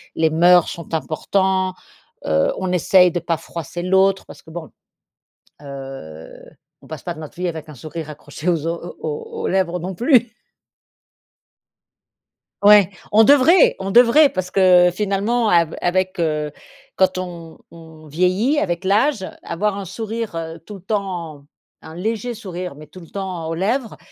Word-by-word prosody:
les 160 0 +2
mœurs 175 +2 +5
sont 170 -1 -9
importants, 185 +4 0 0.5
heu, 80 0 +2
on 185 -1 -2
essaye 180 +1 +4
de 175 - -2
pas 170 -1 -2
froisser 170 +1 -7
l'autre 190 +1 +2
parce - - -13
que 160 - -15
bon, 165 -2 -8 0.9
heu, 135 - -9 0.5
on - - -16
passe - - -8
pas - - -4
notre 155 -1 -10
vie 180 +1 -2
avec 160 -2 -6
un 150 - -10
sourire 155 +4 -8
accroché 150 +2 -7
aux 165 -3 0
o 170 +1 -6
aux 150 -2 -6
aux - - -1
lèvres 180 -2 0
non 185 +3 -5
plus. 245 - +3 2.3
Ouais, 205 -2 +7 0.2
on 220 +1 +6
devrait, 290 - +5
on 195 0 -4
devrait 245 +6 +6
parce 185 -1 -4
que 180 -2 +5
finalement 210 +4 0
av 170 -2 +2
avec, 185 +1 0
heu 150 -2 -1 0.5
quand 190 -1 +2
on 170 -3 -8
on 160 -1 -14
vieillit 185 - +1
avec 175 - -1
l'âge, 210 +2 +1 0.2
avoir 195 +4 -2
un 200 - -5
sourire 225 +1 -5
heu, 165 0 -5
tout 205 +5 -11
le - - -13
temps 180 -7 -4 0.4
un 160 - -11
léger 220 +6 -3
sourire 185 -7 -7
mais 155 +1 -12
tout 185 +5 -14
le 165 - -14
temps 185 -4 -5
aux 165 - -2
lèvres, 225 +7 -2
180 Hz, 160 wpm, -20 LUFS, 165-200 Hz, 2.3 s, Ouais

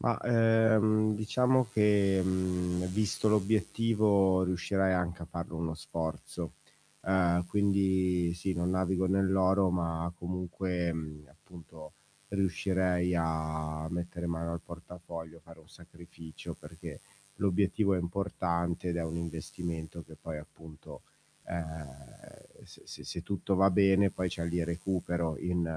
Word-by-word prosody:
Ma, - - +1
ehm, 110 -2 +4
diciamo 125 +4 +2
che 100 -3 +4 0.7
visto 105 +2 +1
l'obiettivo 105 -2 +3
riuscirai 95 +1 +1
anche 85 -1 -1
a - - -4
farlo 85 0 -6
uno 80 -1 -2
sforzo. 80 0 -5 0.5
Ehm, 90 -2 +3
quindi 95 -3 +2
sì, 90 +2 -2
non 85 +1 0
navigo 95 0 +1
nell'oro 95 0 +3
ma 85 -1 -1
comunque 90 0 -2 0.4
appunto 80 -1 -13 0.4
riuscirei 90 -2 +1
a 80 -1 -2
mettere 85 0 -4
mano 85 0 -2
al 85 - -4
portafoglio, 85 -1 -9
fare 85 0 -14
un 80 - -22
sacrificio 85 -3 -11
perché 80 0 -10 0.4
l'obiettivo 100 +1 +2
è - - +1
importante 85 -1 -1
ed 85 - -1
è 85 - -1
un 80 +1 -3
investimento 85 0 -5
che 80 - -14
poi 80 -2 -5
appunto, 80 +1 -12 0.4
ehm, 80 -3 -5 0.8
se - - -15
se - - -9
se 85 - -5
tutto 100 +1 -1
va 95 +1 +5
bene 95 +1 +5
poi, 95 0 -2
cioè 85 - -3
lì 85 0 0
recupero 85 -2 -1
in 90 -1 -1
90 Hz, 125 wpm, -31 LUFS, 85-95 Hz, 0.8 s, va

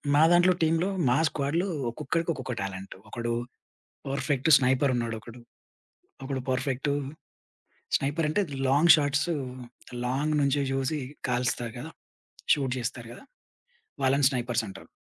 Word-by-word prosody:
మా 150 - +6
దాంట్లో 175 +1 +5
టీమ్‌లో 165 +4 +2 0.2
మా 125 - +3
స్క్వాడ్‌లో 160 +7 -1 0.2
ఒక్కొక్కరికి 165 +8 -1
ఒక్కొక్క 130 -2 -5
టాలెంట్. 95 0 -6
ఒకడు 120 +1 -3 0.8
పర్ఫెక్ట్ 140 +1 0
స్నైపర్ 130 +1 +2
ఉన్నాడొకడు. 115 0 -5 0.8
ఒకడు 135 -1 -3
పర్ఫెక్టు 135 +2 -1 1.1
స్నైపర్ 145 +4 -1
అంటే 155 +7 +1
అది 145 -6 -8
లాంగ్ 145 +6 +7
షాట్సు, 150 +3 +1 0.7
లాంగ్ 140 +5 0
నుంచే 140 0 +2
జూసి 135 +3 -1 0.3
కాలుస్తారు 125 -1 -1
గదా! 150 +6 -7 0.6
షూట్ 135 -3 -1
జేస్తారు 120 -1 -4
గదా! - - -13 0.8
వాళ్ళని 135 +1 +3
స్నైపర్స్ 120 -3 -1
అంటారు. 95 0 -10
135 Hz, 120 wpm, -27 LUFS, 125-150 Hz, 1.1 s, లాంగ్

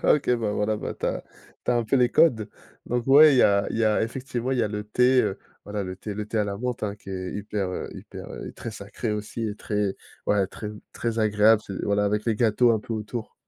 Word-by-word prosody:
Ah - - +6
OK, 145 - -1
bah, 110 -3 -1
voilà, 105 +1 0
bah, - - -5
tu - - -3
as - - -2 0.4
tu - - +1
as 120 - +3
un 120 - +1
peu 125 +5 +2
les 125 -1 +4
codes. 115 -10 +3 0.4
Donc 120 -1 -1
ouais, 145 +2 +8
il - - +3
y - - +7
a 100 0 +4
il - - -3
y 115 - +3
a 110 -1 +3
effectivement, 125 +1 -3
il 130 - 0
y - - +3
a - - +1
le 105 0 -4
thé, 125 +4 +4
heu, 100 -3 -2 0.3
voilà, 105 0 -3
le 95 -1 -5
thé 105 +1 -6
le 105 +1 -4
thé 110 - -2
à 105 - +2
la 100 -1 -3
menthe, 125 +2 -3
hein, 100 -1 -1
qui 100 -1 -12
est 95 -1 -4
hyper, 105 -2 -3
heu, 90 - -4
hyper, - - -9
heu, - - -7
très 115 - -7
sacré 105 +2 -5
aussi 105 +2 -4
et 105 - -4
très 105 -2 -1 0.3
ouais, 100 -2 +3
très, 105 +2 -7 0.2
très 115 -1 -2
agréable, 105 0 +4
c'est 95 - -5
voilà 100 0 +2
avec 105 +1 0
les 115 -2 +1
gâteaux 115 +2 +4
un 110 - +2
peu 115 - -6
autour. 110 +1 -5
105 Hz, 265 wpm, -25 LUFS, 105-120 Hz, 0.4 s, ouais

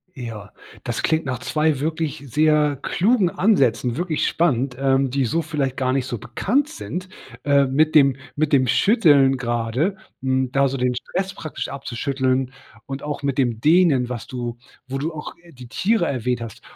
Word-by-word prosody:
Ja, 110 -5 -7 0.3
das 120 - -3
klingt 160 -1 +1
nach 130 -2 -3
2 155 -3 0
wirklich 155 -2 -2
sehr 150 +1 +3
klugen 200 -2 +2
Ansätzen, 135 - +2
wirklich 175 -3 0
spannend, 135 -6 0
ähm, 135 -1 +2
die 135 +1 0
so 165 +8 0
vielleicht 145 -4 -2
gar 130 -2 0
nicht 130 -1 0
so 120 -4 -4
bekannt 260 - 0
sind. 185 - -6 0.3
Äh, 140 -1 +4
mit 155 +4 +1
dem 140 -3 +6 0.2
mit 155 0 0
dem 130 -2 +4
Schütteln 145 - +4
gerade, 120 - -1 0.3
hm, 130 -1 0
da 140 0 +3
so 135 - -3
den 125 0 +1
Stress 190 +9 -3
praktisch 155 - -6
abzuschütteln 130 0 -2 0.3
und 135 0 -6
auch 145 -1 -5
mit 140 -1 -1
dem 120 -4 +1
Dehnen, 155 -4 +4
was 120 -2 -6
du 120 -2 -5 0.3
wo 135 +1 -3
du 160 +4 -2
auch, 150 -1 -7
äh, 175 - -17
die 125 -4 -12
Tiere 195 - +1
erwähnt 125 -2 -1
hast. 115 -3 -8
135 Hz, 175 wpm, -22 LUFS, 125-155 Hz, 0.3 s, dem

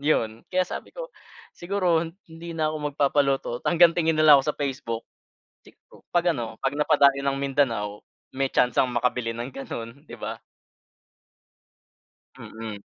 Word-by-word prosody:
'yon. 115 -7 0
Kaya 185 0 +3
sabi - - -6
ko - - -7 0.5
siguro 175 -3 +1 0.3
hindi 165 +1 -8
na 155 -2 0
ako 155 - -3 0.2
magpapaluto, 140 -1 +1
hanggang 170 -1 +5
tingin 165 -2 +2
na 155 - +4
lang 150 - +10
ako - - -9
sa - - -26
Facebook 135 -5 -3 1.1
'pag 175 0 +3
ano 115 -3 -5
'pag 135 +1 -1
napadayo 140 -2 +4
ng 140 0 0
Mindanao 115 -7 0 0.3
may 135 0 0
tsansang 125 +1 +2
makabili 120 -1 0
ng 120 +3 -5
gano'n, 120 -1 -7
'di - - -9
ba? - - -4 2.0
Mm. 110 -2 -8
140 Hz, 140 wpm, -25 LUFS, 120-160 Hz, 2.0 s, lang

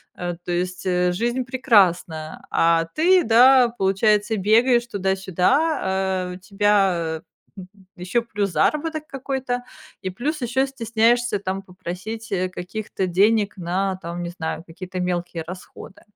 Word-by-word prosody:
э, 175 -1 -4
то 175 - -2
есть, 180 +2 -3
э, 180 -1 +2
жизнь 240 +7 -1
прекрасна. 185 - +1
А 165 0 +3
ты, 360 +3 +4
да, 250 +3 +6
получается, 210 +2 +2
бегаешь 235 +5 +3
туда-сюда, 195 - +1
а 190 -1 -1
у - - -9
тебя 190 -5 +1 0.7
ещё, 180 +7 -1
плюс 205 -3 -2
заработок 310 - 0
какой-то, 265 -2 -3 0.4
и 190 - -3
плюс 285 - -3
ещё 255 +2 +1
стесняешься 235 -2 +1
там 195 0 -4
попросить, 190 +4 -7
э, 185 -1 0
каких-то 190 +2 -4
денег 205 +3 +2
на 185 +2 -1
там, 170 +1 -5
не 175 - -4
знаю, 160 -2 -5
какие-то 185 +2 -7
мелкие 175 -2 -2
расходы. 180 +2 -11
195 Hz, 130 wpm, -22 LUFS, 180-240 Hz, 0.7 s, да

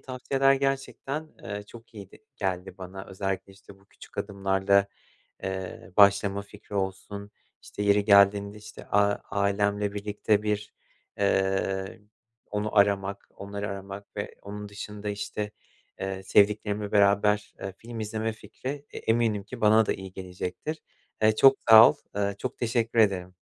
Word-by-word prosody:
tavsiyeler 135 +1 +1
gerçekten, 135 +2 -2
eee, 105 +1 -5
çok 115 +1 -15
iyiydi 100 -3 -11 0.2
geldi 95 -1 -3
bana. 95 +1 -8
Özellikle, 95 0 -4
işte, 95 0 -16
bu 95 - -26
küçük - - -15
adımlarla, 100 0 +2 0.6
eee, 95 -2 -5
başlama 100 0 +5
fikri 100 0 -12
olsun, 100 +1 -4 0.3
işte, - - -8
yeri 100 0 +4
geldiğinde, 100 0 +5
işte, 105 +1 -11
a 100 0 +3 0.2
ailemle 100 0 0
birlikte 105 0 0
bir, 105 0 -2 0.5
eee, 95 +1 0 0.5
onu 105 +1 -2
aramak, 100 -1 +2
onları 100 +1 -5
aramak 100 +1 -8
ve - - -4
onun 105 +1 -7
dışında, 105 0 -6
işte, 105 0 -4 0.5
eee, 95 0 -4
sevdiklerimle 105 +1 +2
beraber, 105 0 +3
eee, 95 -1 -5
film 115 0 -8
izleme 110 +1 -2
fikri 140 +6 -7
e - - -9
eminim 115 -3 +1
ki 115 +4 -10
bana 110 +1 +5
da - - 0
iyi 95 -1 -8
gelecektir. 95 - -5 0.4
Eee, 110 0 +4
çok 135 +2 +7
sağ 110 +1 +11
ol, - - -2 0.2
ııı, 100 -1 0
çok 130 - -5
teşekkür 115 -1 0
ederim. 90 -4 +2
100 Hz, 140 wpm, -27 LUFS, 100-110 Hz, 0.6 s, sağ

